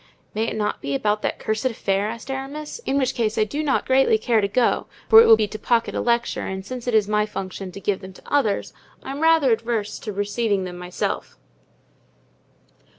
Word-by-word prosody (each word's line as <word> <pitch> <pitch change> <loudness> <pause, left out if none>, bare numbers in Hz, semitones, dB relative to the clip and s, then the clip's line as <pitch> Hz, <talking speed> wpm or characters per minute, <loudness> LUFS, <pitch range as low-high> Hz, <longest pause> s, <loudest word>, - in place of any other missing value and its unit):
"May 220 +2 0
it - - -3
not 210 -1 -2
be 140 0 -2
about 210 +8 0
that - - -2
cursed 215 +2 -2
affair?" 205 -4 0
asked 230 +4 -6
Aramis, 280 +7 -5
"in 275 - +1
which 265 -1 +1
case 220 -3 -1
I 215 - +4
do 285 +8 -3
not 285 -3 0
greatly 260 -3 +4
care 220 0 +2
to 200 - +1
go, 240 +5 +1 0.2
for 445 - +9
it - - +5
will 225 - +9
be 215 -1 +1
to 215 - -7
pocket 235 +1 +1
a - - -1
lecture; 235 0 0
and 190 0 -5
since 250 +2 -7
it 240 - +1
is 210 -2 +4
my 210 0 +1
function 190 -2 -6
to 200 - -9
give 200 -1 -1
them 190 0 -10
to - - -16
others 260 -8 0 0.3
I - - -6
am 275 - -5
rather 320 -5 +4
averse 225 -2 -2
to 215 - -5
receiving 205 0 -1
them 180 -1 -7
myself." 180 0 -4
220 Hz, 215 wpm, -23 LUFS, 205-255 Hz, 0.3 s, for